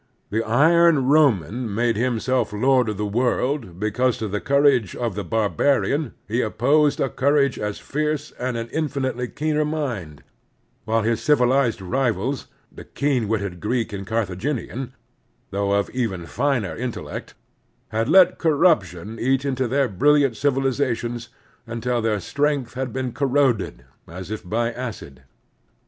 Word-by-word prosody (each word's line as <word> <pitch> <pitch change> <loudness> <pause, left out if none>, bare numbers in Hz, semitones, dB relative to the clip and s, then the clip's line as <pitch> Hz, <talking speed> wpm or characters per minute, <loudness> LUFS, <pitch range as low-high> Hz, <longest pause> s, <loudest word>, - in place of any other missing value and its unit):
The 110 +2 +1
iron 155 +5 +4
Roman 125 - +2
made 115 0 +1
himself 125 +1 0
lord 125 +2 +2
of 105 - -3
the 105 - -2
world 120 - -1
because 120 +4 +1
to 110 - -3
the 105 0 -3
courage 140 -7 +3
of 120 -4 -2
the 100 +2 -4
barbarian 135 +6 0
he 115 +4 0
opposed 140 +7 +2
a - - +2
courage 140 0 +1
as 105 -1 -3
fierce 150 0 -2
and 125 -1 -2
an 115 0 -4
infinitely 135 -5 -2
keener 155 +3 -1
mind; 120 - -4 0.6
while 110 0 +1
his 115 0 0
civilized 125 -5 +2
rivals, 125 +3 -1 0.2
the - - -11
keen 135 -6 -1
witted 100 -5 -2
Greek 115 +1 -1
and 100 -1 -6
Carthaginian, 115 +4 -3 0.6
though 100 0 -1
of 100 0 +1
even 105 -9 -2
finer 110 - -1
intellect, 125 0 -6 0.5
had 115 +1 -1
let 185 -2 +6
corruption 115 - +1
eat 135 +2 +1
into 130 -2 0
their 135 +2 +1
brilliant 140 +4 +3
civilizations 130 -3 -1 0.4
tmtil 120 +1 -1
their 110 -2 0
strength 140 +1 -1
had 130 -1 -3
been 130 +1 -3
corroded 130 - 0 0.2
as 90 +4 -8
if 110 - -5
by 115 +2 0
acid. 115 - -7
125 Hz, 140 wpm, -22 LUFS, 110-140 Hz, 0.6 s, let